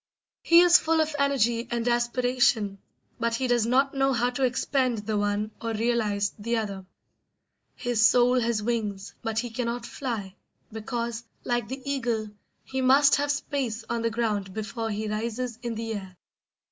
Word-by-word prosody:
He 335 +1 +7
is 355 0 +7
full 325 0 +1
of 315 -1 0
energy 240 -4 +1
and 235 0 -2
aspiration, 240 -3 +1 0.4
but 230 0 0
he 260 - -1
does 240 -2 +2
not 270 +3 +2
know 270 0 +2
how 245 +1 +1
to 265 +2 -2
expend 250 -3 0
the 215 0 -1
one 205 +1 0
or 230 -1 -2
realise 215 -3 0
the 230 +3 -1
other. 200 -4 -4 0.9
His 240 -3 0
soul 250 +1 +4
has 230 -3 0
wings, 210 -4 -2
but 225 -1 -3
he 240 +1 -1
cannot 235 0 -3
fly, 225 -9 -4 0.4
because, 235 +1 -4 0.2
like 240 -3 -1
the 265 +3 -7
eagle, 235 -6 -1 0.3
he 265 0 -3
must 275 +2 +5
have 290 0 -1
space 270 -6 -2
on 235 -1 -1
the 230 - +1
ground 210 -5 -2
before 225 +1 -3
he 215 0 -3
rises 230 +3 -3
in 235 -1 -3
the 225 0 -3
air. 190 -3 -7
235 Hz, 165 wpm, -26 LUFS, 220-255 Hz, 0.9 s, He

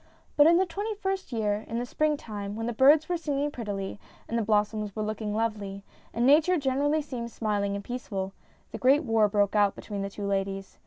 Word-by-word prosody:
But 295 +1 +7
in 340 +1 +6
the 380 - +3
twenty 410 +5 -4
first 385 -4 -3
year, 210 -2 -1
in 230 - -3
the 240 - -1
springtime, 220 -9 -2
when 225 +1 -3
the 240 - -2
birds 290 +6 +5
were 355 - 0
singing 290 -3 -1
prettily, 205 -6 -5 0.3
and 230 - -3
the 230 - +2
blossoms 210 -1 0
were 215 - -2
looking 215 0 -3
lovely, 210 -3 -2 0.3
and 235 +2 0
Nature 310 +6 +5
gener 275 -1 0
ally 305 +2 +2
seemed 250 -5 -5
smiling 205 -3 -1
and 200 - -5
peaceful, 195 -6 -4 0.4
the - - -6
great 275 +5 +4
war 225 -4 +3
broke 205 0 +1
out 205 -1 +3
between 205 -2 -6
the 195 - -3
two 200 0 -6
ladies. 195 -1 -3
225 Hz, 210 wpm, -28 LUFS, 205-290 Hz, 0.4 s, But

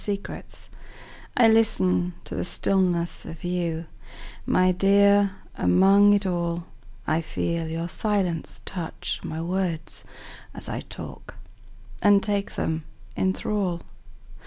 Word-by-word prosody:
Listening 200 -1 -3 1.0
I 240 -2 +7
LISTEN 95 - +3
to - - -7
the - - -2
stillness 180 -3 0
of 165 - -9
you, 170 -2 -2 0.6
My 185 0 +4
dear, 200 +1 +4 0.2
among 195 - +5
it 205 -1 +2
all;I 170 - -3
feel 165 +1 -2
your 165 +1 -3
silence 185 -3 -1
touch 175 -4 -4
my 160 - -4
words 175 -2 -2 0.5
as - - -5
I - - -3
talk, - - -9 0.7
And 205 -1 +5
take 200 -2 -1
them 160 0 -1 0.3
in 190 - +2
thrall. 190 -5 -1
180 Hz, 110 wpm, -25 LUFS, 165-200 Hz, 1.0 s, I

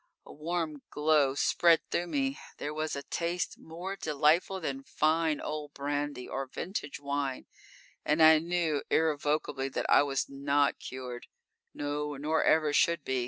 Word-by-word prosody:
A - - -12
warm 155 -1 -3
glow 150 -3 +2
spread 165 +3 +4
through 175 - 0
me; 270 +6 -1 0.2
there 150 - -4
was 155 0 -2
a 140 - -5
taste 170 +3 -2
more 175 +4 -6
delightful 160 +3 +2
than 135 -5 -3
fine 155 +2 +1
old 150 -1 -5
brandy, 145 -2 -3
or 135 0 -4
vintage 160 +1 -5
wine, 140 -2 -2 0.6
and 150 +2 +1
I 155 0 +8
knew 165 -3 0
irrevocably 150 -3 0
that - - -3
I - - +6
was 140 -2 -1
not 140 +1 +1
cured; 125 -1 -7 0.5
no, 145 0 -3
nor 155 +3 +1
ever 155 -2 +3
should 170 +2 +3
be! 130 -1 -1
150 Hz, 150 wpm, -30 LUFS, 140-160 Hz, 0.6 s, I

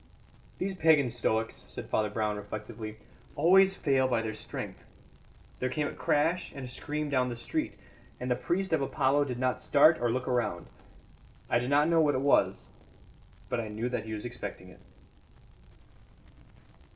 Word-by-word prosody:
"These 195 +1 -2
pagan 160 -8 +4
stoics," 115 -1 -1
said - - -8
Brown 105 0 0
reflectively, 110 +1 -7 0.4
"always 190 +5 +5
fail 135 -5 +2
by 120 -3 0
their 110 -1 -3
strength. 110 - -7 0.8
There 130 - 0
came 150 +2 -1
a - - -4
crash 165 +5 +1
and 135 -2 -7
a - - -7
scream 150 +4 -3
down 130 -2 +2
the 120 - -4
street, 120 0 -2 0.4
and 125 0 -3
the - - +4
priest 185 +6 -1
of 160 - +2
Apollo 140 +1 +2
did 125 -3 -4
not 130 0 0
start 155 +3 +5
or 120 - +2
look 125 +1 -2
round. 120 -9 -1 0.9
I - - +4
did 125 +1 -3
not 145 +2 +4
know 165 -1 +4
what 150 -2 +3
it 130 - 0
was. 140 0 +2 0.8
But 125 - -1
I 115 - -3
knew 110 +3 -3
that 120 -3 -3
he 110 - -5
was 105 +2 -5
expecting 120 -6 -7
it." - - -16
125 Hz, 165 wpm, -30 LUFS, 115-150 Hz, 0.9 s, always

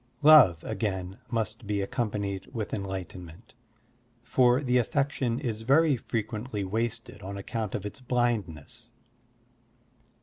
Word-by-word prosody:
Love, 145 - +8
again, 95 -3 -3
must 115 -1 -3
be 105 -1 0
accompanied 100 -2 -2
with 110 -3 -3
enlightenment, 95 0 -6 0.7
for 125 +2 +3
the 125 -1 +3
affection 130 -1 0
is 115 -6 -3
very 140 +5 +4
frequently 110 -1 -3
wasted 115 +2 -3
on 100 +1 -6
account 105 +1 -4
of 105 - -4
its 105 +7 -6
blindness. 115 - -2
110 Hz, 110 wpm, -28 LUFS, 100-120 Hz, 0.7 s, Love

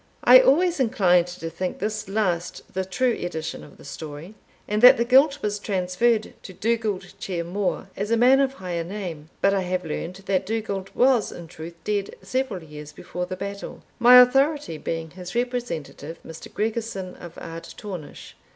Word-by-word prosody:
I - - +9
always 350 - +3
inclined 180 -8 +3
to 175 -2 -7
think 180 +2 -4
this 215 0 -3
last 180 -4 -1
the 190 0 -1
true 235 +7 0
edition 160 -5 -5
of 145 - -15
the - - -15
story, 150 +5 -8 0.3
and 210 +1 0
that 250 +2 +9
the 235 - +1
guilt 275 +3 +4
was 210 -1 -1
transferred 205 +4 0
to 190 - -10
Dugald 215 -2 -1
Ciar 175 -4 -3
Mhor, 190 +3 -2
as 205 +2 -3
a 230 - +3
man 255 +3 +6
of 270 -1 +2
higher 180 -7 -4
name, 170 -5 -6
but 195 - +4
I 195 - +1
have 180 0 -2
learned 165 +3 -4
that 190 -2 0
Dugald 200 -3 -3
was 250 -3 +3
in 170 - -9
truth 165 0 -9
dead 205 -2 -2
several 255 -9 -2
years 150 -1 -10
before 180 +4 -6
the 185 - -4
battle 200 +1 -7 0.2
my 245 +1 +9
authority 270 - +3
being 165 -1 -4
his 180 +3 -9
representative, 235 - -3
Mr. 160 0 -10
Gregorson 215 -4 -3
of 170 -1 -11
Ardtornish. 165 0 -8
195 Hz, 170 wpm, -24 LUFS, 175-235 Hz, 0.3 s, I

